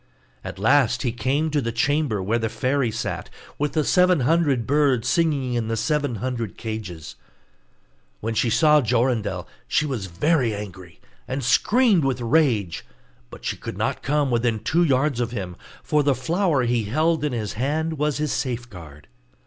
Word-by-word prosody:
At - - -7
last 125 +3 +3
he 120 - 0
came 135 +7 -1
to 145 -1 +1
the 115 -2 -2
chamber 125 -3 0
where 115 +5 0
the 110 -1 -1
fairy 130 +2 0
sat, 110 - -4 0.3
with 145 -1 -1
the 155 - +1
seven 180 -1 +3
hundred 145 -4 +2
birds 135 -4 +2
singing 145 -5 +1
in 120 -2 -1
the 115 0 -1
seven 145 -2 0
hundred 115 -1 -4
cages. 105 -8 -6 1.0
When 115 +1 -3
she 110 +2 +1
saw 150 +5 +5
Jorindel 115 -6 0 0.2
she 155 - +1
was 125 -9 -3
very 120 - +1
angry, 95 -4 -9 0.3
and 135 +1 -3
screamed 210 - +3
with 135 -2 0
rage; 115 - +1 0.5
but - - -12
she - - -1
could - - -7
not - - -1
come 145 -1 0
within 120 -1 +1
two 170 +3 +2
yards 140 -3 +1
of 120 -1 0
him, 95 -6 -5 0.3
for 150 - +2
the 140 -2 +2
flower 160 - +1
he 120 -2 0
held 155 +7 +1
in 150 - 0
his 110 -4 -3
hand 150 +6 -2
was 150 -1 0
his 150 -1 -1
safeguard. 95 - -5
125 Hz, 170 wpm, -23 LUFS, 115-150 Hz, 1.0 s, saw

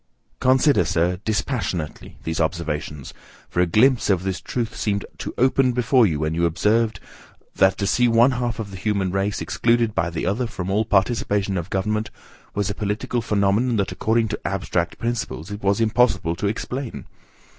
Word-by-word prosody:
Consider, 130 +3 +4
Sir, 90 +2 0
dispassionately, 100 - -3
these 80 0 -2
observations, 75 -3 -3 0.3
for 90 - 0
a 90 - +3
glimpse 120 +8 +3
of 95 -3 +2
this 95 -1 -3
truth 120 -3 -3
seemed 100 -2 -1
to - - -4
open 130 0 +3
before 125 -1 +4
you 80 -5 -1
when 80 +1 -1
you 85 +1 +2
observed, 105 +5 +1 0.6
"that 95 0 +4
to 100 - -1
see 125 +4 +3
one 120 +3 +5
half 120 -2 -2
of 105 -3 -5
the 95 - -7
human 100 -1 -1
race 95 +2 -1
excluded 115 -2 +1
by 85 - 0
the 85 -1 -4
other 110 +7 0
from 95 -4 -5
all 105 +3 +1
participation 100 -1 +1
of 85 0 -3
government, 105 +3 -1 0.5
was 100 -1 0
a 100 - -1
political 105 +4 -2
phenomenon 105 +3 +1
that, 100 -2 0
according 110 0 +1
to 105 - -3
abstract 90 -3 -2
principles, 115 -6 -3
it 100 - -6
was 100 +1 +1
impossible 110 -7 +2
to 100 - -2
explain." 125 +4 -4
105 Hz, 175 wpm, -22 LUFS, 95-115 Hz, 0.6 s, one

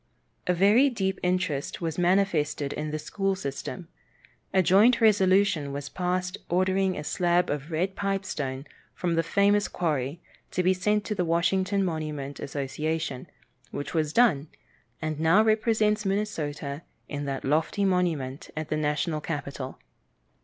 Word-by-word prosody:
A 180 - +3
very 210 +10 +5
deep 190 -6 -2
interest 180 -6 -1
was 165 -1 -3
manifested 175 -6 +1
in 155 - -3
the 155 - -2
school 195 +5 -1
system. 140 -8 -5 0.6
A 190 - +3
joint 215 +8 +5
resolution 195 - +3
was 140 -1 -5
passed 180 +4 -2
ordering 185 +1 +1
a - - -4
slab 175 +2 +1
of 145 +1 -4
red 180 +4 -1
pipestone 190 -10 -3 0.3
from 175 -2 -1
the 165 - +3
famous 200 +5 +2
quarry 150 -3 -2 0.3
to 185 - -1
be 185 +1 +4
sent 210 +3 0
to 215 - -2
the 190 -3 0
Washington 185 +4 +1
monument 150 -4 -4
association, 145 +1 -3 0.4
which 145 - -5
was 155 -3 0
done, 165 - +3 0.6
and 155 -1 -2
now 165 +7 +5
represents 215 -1 +2
Minnesota 160 -8 -2 0.3
in 145 -1 -4
that 135 -1 -3
lofty 160 +8 +1
monument 165 -8 -1
at 155 0 -3
the 155 - 0
national 155 +1 -1
capital. 140 -4 -5
175 Hz, 140 wpm, -27 LUFS, 150-195 Hz, 0.6 s, very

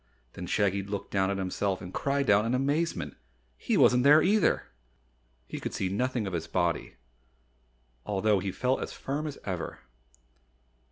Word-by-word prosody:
Then 90 - -7
Shaggy 100 0 +1
looked 100 +1 -5
down 95 -1 +1
at 100 - -1
himself 95 0 -1
and 90 0 -9
cried 140 -1 0
out 100 +1 +5
in 115 +3 0
amazement 135 - -1 0.4
he - - 0
wasn't 125 0 +5
there 150 +3 +7
either! 210 +3 +3 0.8
He - - -6
could - - -5
see 95 - -1
nothing 125 +3 -1
of 95 - -4
his 80 -2 -3
body, 85 -3 -1 1.1
although 105 0 +1
he 95 +1 -3
felt 125 +7 0
as - - -5
firm 145 +3 -3
as 145 - -6
ever. 90 -4 -4
100 Hz, 160 wpm, -29 LUFS, 95-135 Hz, 1.1 s, there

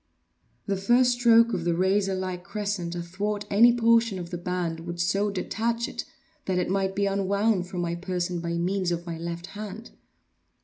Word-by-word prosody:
The 200 -2 -1
first 240 +6 +4
stroke 235 -1 +5
of 170 - -1
the 170 -1 +1
razorlike 190 -1 0
crescent 200 -3 -3
athwart 200 +5 -3
any 230 +4 +7
portion 230 -3 +3
of 175 -1 -7
the 175 - -3
band, 175 -2 -2
would 170 +1 -6
so 195 +4 +1
detach 230 +4 -1
it - - -5 0.4
that 185 -1 0
it 180 0 0
might 195 0 0
be 200 0 +1
unwound 200 0 +1
from 180 -1 -4
my 170 -1 -1
person 180 0 -2
by 170 0 -3
means 180 +2 0
of 170 0 -3
my 165 -2 -5
left 170 +1 -5
hand. 210 +2 -7
190 Hz, 175 wpm, -26 LUFS, 175-210 Hz, 0.4 s, any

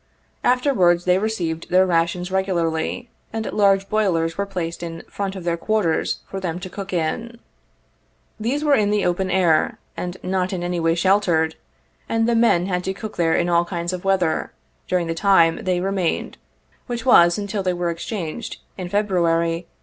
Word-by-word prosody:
Afterwards 220 -10 +3
they 180 +1 +3
received 175 -7 -2
their 185 +1 +5
rations 175 +1 0
regularly, 185 +3 -1 0.2
and 225 0 -3
large 195 -1 +3
boilers 170 -6 +1
were 200 +2 -2
placed 175 -4 -4
in 165 -1 -6
front 195 -1 -4
of 190 - -7
their 170 -1 0
quarters 200 -3 0
for 195 - -6
them 175 -3 -3
to 185 -1 -7
cook 200 0 -6
in. 190 +8 -2 1.0
These 255 +7 -1
were 295 -2 +3
in 210 -6 +3
the 210 -1 +1
open 180 +2 0
air, 170 -5 +2 0.2
and 180 +1 -5
not 185 0 -1
in 175 -2 -3
any 175 0 -2
way 165 0 +2
sheltered, 175 -3 +2 0.5
and 225 0 +1
the 235 - +2
men 225 -7 +3
had 180 -1 -1
to 190 - -2
cook 215 +1 -7
there 165 -2 +2
in 175 - +1
all 170 0 +3
kinds 175 0 -4
of 180 - -5
weather, 185 -5 +1 0.4
during 180 -2 +1
the 165 - -2
time 165 -2 +3
they 180 -1 +1
remained, 190 -2 -2 0.5
which 240 0 -4
was 175 -9 +6
until 205 0 -3
they 185 -1 0
were 175 -1 -1
exchanged 175 +4 -5 0.2
in 180 -1 -4
February, 170 -4 +1
1862. - - -40
185 Hz, 180 wpm, -22 LUFS, 170-200 Hz, 1.0 s, was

